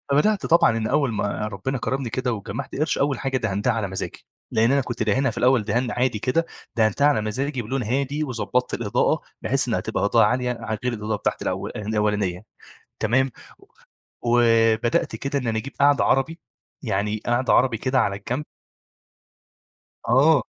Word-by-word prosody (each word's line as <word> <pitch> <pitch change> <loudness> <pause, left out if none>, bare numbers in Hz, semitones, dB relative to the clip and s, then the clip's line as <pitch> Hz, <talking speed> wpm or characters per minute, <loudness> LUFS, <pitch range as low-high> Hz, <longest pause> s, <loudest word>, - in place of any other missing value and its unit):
فبدأت 200 +9 +2
طبعًا 160 -8 +4
إن 110 -1 -1
أول 135 +1 +1
ما 105 0 -2
ربنا 115 +7 -3
كرمني 130 -1 -2
كده 125 +1 -1
وجمعت 100 0 -5
قرش، 155 +3 0
أول 140 -2 +1
حاجة 135 -1 -1
دهنتها 115 0 0
على 110 -3 -2
مزاجي. 95 0 -6 0.3
لأن 115 +3 +3
أنا 140 - +3
كنت 120 -3 -3
داهنها 125 +5 +2
في 110 - -6
الأول 125 -3 +3
دهان 120 +4 0
عادي 125 -3 0
كده، 150 +9 0 0.3
دهنتها 110 +5 +3
على 145 -6 +3
مزاجي 130 +5 -2
بلون 130 +4 -2
هادي 140 +6 -1
وضبطت 125 -1 -1
الإضاءة 110 -4 +1 0.2
بحيث - - +1
إنها - - 0
تبقى - - -2
إضاءة - - +4
عالية 125 0 0
ع 110 - -3
غير 125 - +1
الإضاءة 105 -1 -2
بتاعتي - - -2
الأو - - -2
الأولانية 105 -3 -1 0.6
تمام؟ 125 +4 +2 0.9
وبدأت 115 -1 +3
كده 140 +1 -2
إن 125 - -4
أنا 110 -1 0
أجيب 130 +5 -8
قعدة 140 -6 +5
عربي، 135 +8 +1 0.4
يعني 105 +2 -1
قعدة 120 +2 +2
عربي 125 -3 +3
كده 130 +3 +1
على 100 -4 +1
الجنب. 125 +8 -4 1.6
آه، 140 +4 +5
120 Hz, 165 wpm, -23 LUFS, 110-135 Hz, 1.6 s, قعدة